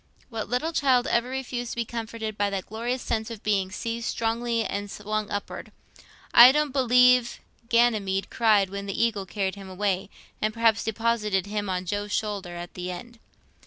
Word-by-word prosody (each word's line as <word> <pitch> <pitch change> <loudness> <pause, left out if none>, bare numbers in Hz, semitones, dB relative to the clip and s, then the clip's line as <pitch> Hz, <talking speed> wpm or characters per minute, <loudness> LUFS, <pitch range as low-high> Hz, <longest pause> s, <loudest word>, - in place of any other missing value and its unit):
What 220 -3 -4
little 300 +8 -1
child 260 -5 +3
ever 235 +1 +1
refused 250 -2 -4
to - - -8
be 235 -1 -1
comforted 225 -1 -5
by 205 0 0
that 195 -2 -3
glorious 240 +4 -3
sense 220 -1 -2
of 225 -3 -8
being 195 -3 +1
seized 230 +3 -4
strongly 230 0 -1
and 205 0 -4
swung 210 +1 -3
upward? 205 0 -5 0.6
I 240 +2 +10
don't 300 -1 0
believe 250 -2 +4 0.3
Ganymede 215 -5 +2
cried 210 -4 +3
when 200 0 -5
the 195 - -3
eagle 215 -4 0
carried 195 -1 -2
him 195 -1 -10
away, 190 0 -1 0.3
and 215 +1 0
perhaps 225 -1 +3
deposited 220 -3 0
him 205 -1 -3
on 185 0 -2
Jove's 205 +3 -2
shoulder 200 -5 -3
at 175 0 -7
the 180 0 -5
end. 230 +7 -8
220 Hz, 175 wpm, -26 LUFS, 200-235 Hz, 0.6 s, I